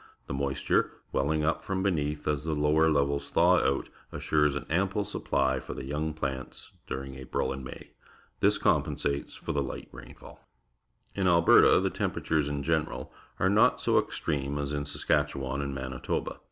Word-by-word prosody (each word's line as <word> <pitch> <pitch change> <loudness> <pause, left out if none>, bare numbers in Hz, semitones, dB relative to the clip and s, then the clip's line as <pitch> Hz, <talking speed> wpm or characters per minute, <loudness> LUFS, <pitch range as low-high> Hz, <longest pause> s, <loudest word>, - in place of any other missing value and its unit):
The - - -5
moisture, 70 0 0 0.2
welling 75 +3 +1
up 85 - 0
from 95 -1 -2
beneath 75 -6 -1
as 75 -1 0
the 80 -1 -1
lower 75 +2 +3
levels 70 -1 +1
thaw - - +4
out, 70 - 0 0.2
assures 75 -2 +1
an 70 - -4
ample 100 +5 0
supply 65 -5 0
for - - -7
the 65 - -6
young 75 +3 -2
plants 65 -4 -5 0.2
during 70 0 -5
April 65 0 -2
and 65 0 -7
May. 65 - -10 0.5
Tliis - - +4
compensates 70 0 0
for - - -5
the 70 - 0
hght 65 - -6
rainfall. - - -13 0.7
In 95 -2 0
.Hberta, 85 -1 +6
the - - +1
temperatures, 80 -3 -1
in 70 -1 -3
general, 80 +1 -1 0.3
are - - +3
not - - +4
so - - +3
extreme 70 -2 -2
as 70 0 -2
in 70 -1 -2
Saskatchewan 70 -2 -1
raid 70 - -3
Manitoba. 65 -1 -3
70 Hz, 165 wpm, -29 LUFS, 70-80 Hz, 0.7 s, Hberta